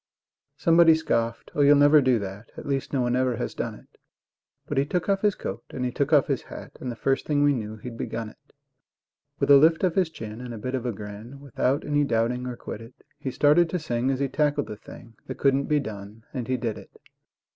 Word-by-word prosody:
Somebody 165 -2 +6
scoffed: 115 -7 -2
"Oh, 145 - 0
you'll 145 +1 +7
never 145 +1 +6
do 130 -2 +3
that; 100 +2 -7
At - - -8
least 135 -1 -2
no 135 - 0
one 120 0 +1
ever 130 -1 +1
has - - -4
done - - -4
it"; - - -20 0.7
But 145 - -1
he - - +3
took 175 +2 -1
off 195 -1 +1
his 205 -2 +2
coat - - -6
and 125 -1 -4
he 125 - -1
took 140 +4 -1
off 145 -4 +5
his - - -1
hat, - - -10
And 125 - -3
the - - -6
first 135 +3 -1
thing 145 -1 +2
we 145 0 +4
knew 110 -4 -4
he'd 115 +2 -9
begun 115 -1 -4
it. - - -22 0.9
With - - +2
a 140 - +10
lift 160 +4 +4
of 180 -3 +2
his 185 -2 +2
chin 110 -6 -8
and 125 -2 -6
a - - -7
bit 125 +5 -5
of 125 -2 -2
a - - 0
grin, 105 +5 -9
Without 140 0 -1
any 145 0 +2
doubting 125 0 0
or 125 -1 -5
quiddit, 115 +2 -9 0.2
He 135 - -3
started 150 +6 +4
to 180 - -1
sing 125 -6 -1
as 135 -1 0
he 140 - +1
tackled 145 +1 0
the 105 - -7
thing 115 +1 -14
That 130 - -6
couldn't 140 0 +2
be 150 -1 +2
done, 110 -3 -8
and 125 -4 -4
he 130 0 0
did 115 -3 -3
it. - - -15
130 Hz, 240 wpm, -25 LUFS, 115-145 Hz, 0.9 s, a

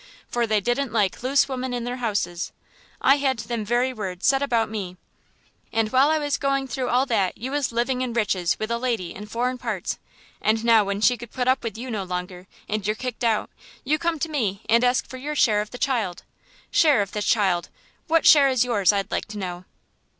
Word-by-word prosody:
For 240 -1 0
they 215 -1 +2
didn't 240 +4 -1
like 210 -4 0
loose 265 +3 +3
women 260 -2 -3
in 240 - -3
their 245 +1 -4
houses; 200 -7 -2 0.5
I 275 +2 +5
had 270 -3 0
them 230 0 -3
very 240 +4 +1
words 190 -6 -5
said 270 0 +4
about 235 -5 +1
me. 195 -4 -5 0.7
And 225 -1 0
while 265 +3 +5
I 315 - +3
was 290 -2 -1
going 275 -1 0
through 255 0 -3
all 250 +2 +3
that 210 -8 0
you 255 +4 -5
was 285 -3 0
living 245 +2 0
in 255 -2 -2
riches 195 -6 0
with 215 +1 -4
a 235 - 0
lady 230 -9 -2
in 210 +1 -9
foreign 245 +3 -2
parts; 215 -6 -3 0.4
and 220 +1 +1
now 225 -2 +6
when 200 0 -3
she 245 +2 +4
could 240 0 -9
put 250 +1 -3
up 260 +1 +2
with 225 -1 -4
you 250 +2 -6
no 210 -3 -2
longer, 180 0 -5 0.2
and 210 -1 -2
you're 215 - +1
kicked 250 0 -5
out, 225 -2 +1 0.3
you 305 +4 +1
come 335 -1 0
to 320 - -2
me 220 -10 -2
and 230 +2 +4
ask 250 +1 +2
for 260 - -8
your 295 +4 -4
share 215 -7 +3
of 210 - -6
the 245 - -8
child. 225 -10 -1 0.5
Share 290 -10 +4
of 200 - -9
the 210 - -3
child! 195 -6 +1 0.4
What 330 0 +3
share 285 -3 +8
is 255 -2 +2
yours, 215 -6 +3
I'd 200 -1 -2
like - - -1
to 210 0 -8
know?" 180 -2 -5
235 Hz, 225 wpm, -24 LUFS, 210-260 Hz, 0.7 s, share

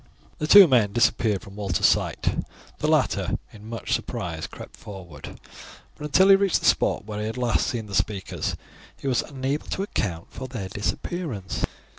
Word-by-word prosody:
The 150 - -1
two 200 +2 +10
men 115 -8 +3
disappeared 110 -3 +2
from 100 - -12
Walter's 100 -5 0
sight. - - +1 0.4
The - - 0
latter - - +1 0.2
in 110 0 -12
much 115 -1 -3
surprise 80 -2 -3
crept - - -11
forward, 90 -8 -10 0.6
but 150 - -7
until 185 +6 +4
he 195 - +10
reached 195 -2 +2
the - - -4
spot - - +2
where 105 -1 -5
he 105 - -2
had 110 - -5
last 125 -2 +1
seen 115 -3 -3
the 100 - -10
speakers 100 -1 -1 0.4
he - - -6
was 125 -3 +2
unable 140 +1 -3
to 190 - -2
account 85 - -3
for 130 - -7
their 110 -7 -6
disappearance. 105 - -3
110 Hz, 175 wpm, -25 LUFS, 100-140 Hz, 0.6 s, two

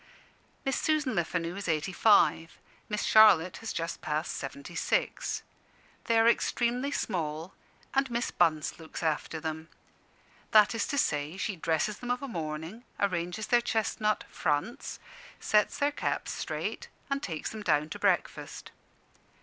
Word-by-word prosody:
Miss 270 -1 0
Susan 305 -4 +1
Lefanu 170 0 -1
is 200 -1 -5
eighty 160 +2 0
five; 175 -5 +4 0.3
Miss 210 0 -1
Charlotte 185 -6 +6
has 225 - -5
just 165 0 -4
passed 155 +1 -2
seventy 140 +4 -7
six. 165 - -1 0.6
They 230 - +3
are 225 0 +5
extremely 240 +3 +1
small, 165 - -3 0.4
and 270 0 +2
Miss 235 0 -1
Bunce 160 -1 +1
looks 160 +1 -8
after 160 0 -1
them. 160 0 -5 0.8
That 215 0 +6
is 225 - -1
to 285 - -2
say, 150 - 0
she 200 0 -2
dresses 165 +5 -1
them 245 - -6
of 245 +2 -1
a - - -3
morning, 165 - -5 0.2
arranges 180 +1 -1
their 240 -1 +4
chestnut 215 -2 0
"fronts," 160 - -2 0.4
sets 210 -1 +2
their 285 +1 +2
caps - - -2
straight, - - -4 0.2
and 275 0 0
takes 165 - -4
them 220 - -7
down 150 -6 +2
to - - -6
breakfast. - - -1
185 Hz, 145 wpm, -29 LUFS, 160-230 Hz, 0.8 s, Charlotte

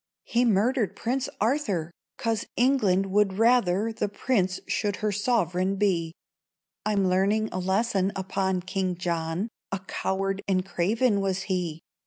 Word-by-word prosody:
He 240 +1 +1
murdered 225 +1 +2
Prince 255 +3 -1
Arthur, 210 - 0 0.3
'Cause 225 -2 -1
England 220 -7 +3
would 195 -1 +2
rather 225 -2 +3
The 220 -2 -2
Prince 195 -3 0
should 205 -2 -1
her 215 0 -1
sovereign 195 -3 +1
be. 180 -5 +1 0.7
I'm 205 -2 +1
learning 200 +4 +2
a 185 - -3
lesson 195 +1 +1
upon 190 -1 -1
King 185 0 -1
John: 170 +2 -2 0.2
A 195 - 0
coward 195 +1 -2
and 185 -2 +1
craven 205 +4 +1
was 195 -1 -1
he. 175 -5 -2
195 Hz, 135 wpm, -26 LUFS, 185-220 Hz, 0.7 s, England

